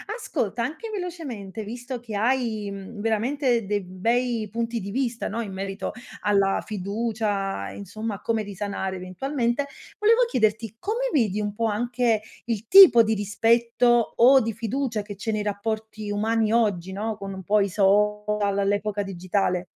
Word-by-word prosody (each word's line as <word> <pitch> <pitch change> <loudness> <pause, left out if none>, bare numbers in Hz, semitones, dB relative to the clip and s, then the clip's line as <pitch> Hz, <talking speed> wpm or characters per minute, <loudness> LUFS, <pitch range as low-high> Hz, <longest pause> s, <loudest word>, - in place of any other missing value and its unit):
Ascolta, 235 - -2
anche 310 - -5
velocemente, 295 - -5
visto 245 +3 -6
che 225 -3 -7
hai, 220 -2 0
mhmm, 200 +2 -8
veramente 235 +2 +1
dei 205 +1 0
bei 230 +5 -1
punti 230 +2 -2
di 200 -1 -6
vista, 245 0 -1
no, 230 +3 -3
in 210 -4 -5
merito 195 +1 -4 0.3
alla 200 -1 +2
fiducia, 205 - -2
insomma, 215 - -5
a - - -12
come 225 -1 0
risanare 200 -1 -4
eventualmente, 240 +8 -2 0.3
volevo 450 +3 +5
chiederti 220 - 0
come 470 +6 -1
vedi 210 - +1
un 205 -1 -2
po' 230 +2 -1
anche 235 +1 +1 0.2
il 225 -2 -3
tipo 375 -12 +10
di 220 0 +1
rispetto 235 +3 +2
o 260 +3 +7
di 225 -2 -2
fiducia 230 +1 -2
che 205 -1 -8
c'è 220 +2 -3
nei 210 - -1
rapporti 215 +1 -4
umani 220 +1 +1
oggi, 195 -6 +1
no, 215 +3 -3
con 195 -1 -6
un 190 0 -8
po' 210 +3 +3
i 200 - +1
social, 210 +1 +2
all'epoca 205 +1 0
digitale? 185 -1 -1
215 Hz, 155 wpm, -25 LUFS, 200-235 Hz, 0.3 s, tipo